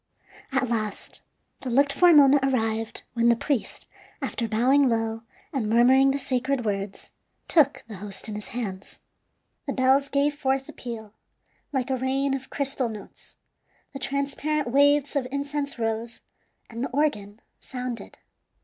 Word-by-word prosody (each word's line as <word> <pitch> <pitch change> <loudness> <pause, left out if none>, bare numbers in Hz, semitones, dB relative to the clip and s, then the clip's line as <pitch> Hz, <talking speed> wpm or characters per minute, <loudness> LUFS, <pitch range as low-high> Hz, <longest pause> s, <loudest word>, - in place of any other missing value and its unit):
At 265 -1 +1
last 215 -3 -3 0.4
the 260 - -5
looked 280 +3 +3
for 355 +4 +6
moment 285 -3 +7
arrived, 225 -4 -1
when 235 0 +3
the 235 - +5
priest, 260 0 -2 0.3
after 235 - -2
bowing 255 +5 +3
low 225 -1 -1 0.3
and 235 -6 -1
murmuring 255 +4 +5
the 275 - +1
sacred 255 -1 -1
words, 195 -1 -4 0.4
took 280 -5 +3
the 215 -3 -8
host 200 +2 -3
in 215 - -5
his 210 0 -5
hands. 200 -5 -6 0.7
The - - -1
bells 270 +2 +3
gave 285 +1 +2
forth 270 -2 -1
a - - -10
peal, 220 -4 -7 0.6
like 265 -1 -1
a 260 - +1
rain 270 +2 0
of 265 -1 -4
crystal 275 -3 -2
notes; 215 -2 -11 0.6
the 275 - -6
transparent 280 +1 -1
waves 285 +2 +4
of 265 -3 0
incense 280 0 -3
rose, 225 0 -3 0.5
and 235 +1 -5
the - - -2
organ 220 -8 -1 0.2
sounded. 250 -2 -6
260 Hz, 150 wpm, -26 LUFS, 225-280 Hz, 0.7 s, moment